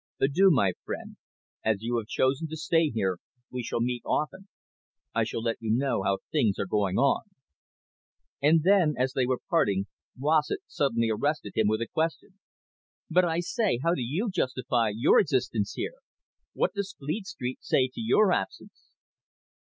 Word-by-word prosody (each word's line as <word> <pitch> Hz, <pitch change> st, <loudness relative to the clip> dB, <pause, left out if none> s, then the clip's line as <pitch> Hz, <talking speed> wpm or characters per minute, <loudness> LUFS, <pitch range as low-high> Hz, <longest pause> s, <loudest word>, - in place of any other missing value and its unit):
Adieu, 160 Hz, +9 st, +4 dB
my 100 Hz, -, +3 dB
friend. -, -, -6 dB, 0.5 s
As 110 Hz, -1 st, 0 dB
you 120 Hz, +1 st, 0 dB
have 110 Hz, -2 st, -3 dB
chosen 135 Hz, +6 st, +1 dB
to 160 Hz, +1 st, -6 dB
stay 165 Hz, 0 st, +2 dB
here, 95 Hz, -7 st, -1 dB, 0.3 s
we 125 Hz, -, -3 dB
shall 115 Hz, -, -2 dB
meet 120 Hz, 0 st, -1 dB
often. 185 Hz, +6 st, -2 dB, 0.7 s
I -, -, +2 dB
shall 115 Hz, -, -4 dB
let 115 Hz, -1 st, -1 dB
you 110 Hz, -, -5 dB
know 125 Hz, -1 st, +1 dB
how 95 Hz, 0 st, +1 dB
things 115 Hz, -, +2 dB
are -, -, -1 dB
going 100 Hz, -1 st, 0 dB
on." 140 Hz, -, +3 dB, 1.2 s
And 155 Hz, +2 st, +4 dB
then, 180 Hz, -5 st, +4 dB
as 130 Hz, +1 st, 0 dB
they 130 Hz, -2 st, +1 dB
were 130 Hz, -1 st, +1 dB
parting, 100 Hz, -, +2 dB, 0.3 s
Rossett 150 Hz, +2 st, +1 dB
suddenly 115 Hz, -5 st, 0 dB
arrested 125 Hz, -2 st, -1 dB
him 110 Hz, -, +3 dB
with 110 Hz, +1 st, +1 dB
a -, -, -7 dB
question. 165 Hz, +5 st, -3 dB, 0.7 s
"But, 180 Hz, +2 st, +4 dB
I 165 Hz, 0 st, 0 dB
say, 215 Hz, -, 0 dB
how 170 Hz, -, +3 dB
do 155 Hz, -, -2 dB
you 165 Hz, -, -1 dB
justify 130 Hz, -7 st, 0 dB
your 115 Hz, +7 st, +4 dB
existence 125 Hz, -7 st, 0 dB
here? -, -, -4 dB, 0.6 s
What -, -, 0 dB
does 200 Hz, -1 st, -4 dB
Fleet 155 Hz, +9 st, -4 dB
Street 130 Hz, -9 st, -5 dB
say 130 Hz, -, +2 dB
to -, -, -6 dB
your 215 Hz, -3 st, +4 dB
absence?" 95 Hz, -, -4 dB
135 Hz, 170 wpm, -28 LUFS, 115-165 Hz, 1.2 s, Adieu